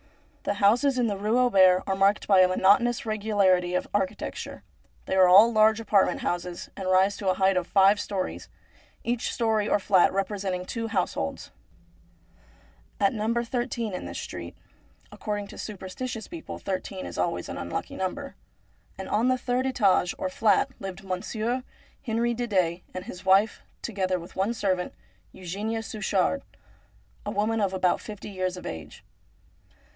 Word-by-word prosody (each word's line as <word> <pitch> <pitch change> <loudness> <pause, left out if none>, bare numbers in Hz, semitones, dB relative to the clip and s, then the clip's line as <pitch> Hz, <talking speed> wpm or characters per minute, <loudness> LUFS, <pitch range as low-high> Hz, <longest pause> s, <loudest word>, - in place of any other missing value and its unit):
The 200 - 0
houses 240 +7 +3
in 245 - +2
the 210 -3 0
Rue 210 +4 +1
Auber 190 -7 +5
are 195 - 0
marked 195 +2 +2
by 195 -2 +5
a 185 - +7
monotonous 205 +7 +3
regularity 200 -5 +2
of - - -1
architecture. 195 -2 -3 0.4
They - - -3
are 185 -1 +6
all 205 +6 +7
large 215 0 +4
apartment 210 -3 +2
houses 175 0 -3
and 190 -2 -4
rise 190 +2 +4
to 195 - -1
a 185 - +2
height 190 0 +3
of 180 -1 0
five 200 +1 +5
storeys, 195 -3 -4 0.5
each 240 0 -1
storey 220 -3 0
or - - +4
fiat 190 -2 +4
representing 190 -2 -2
two 230 +3 -4
households. 180 - -2 1.5
At 200 -1 +3
No. 215 0 -1
13 235 -2 -2
in 180 - -5
this - - -6
street - - -7 0.3
— - - -33
according 205 -1 -4
to - - -11
super 200 -3 -7
stitious 225 +4 -5
people 335 -1 -8
thirteen 185 - -4
is 85 -1 -6
always 90 0 -1
an - - -6
unlucky 85 0 -4
number 275 +10 -4 0.3
— - - -36
and - - -6
on 230 +4 +1
the 255 0 +3
third 250 +1 -1
etage 195 -8 +2
or 185 - -2
flat 220 +7 +2
lived 195 0 -7
Monsieur 220 +6 -2 0.4
Henri 235 -1 0
Didet 185 -8 0
and 185 - -5
his 180 - -9
wife, 195 +3 +3 0.2
together 190 -4 -1
with 170 +1 -12
one 200 +5 0
servant, 185 -4 -1 0.4
Eugenia 205 +5 -4
Suchard, 215 +4 0 0.8
a - - -4
woman 220 +2 0
about 185 -2 +1
fifty 210 -1 -8
years 185 -1 -2
of - - -9
age. 80 -2 -8
200 Hz, 160 wpm, -26 LUFS, 185-225 Hz, 1.5 s, a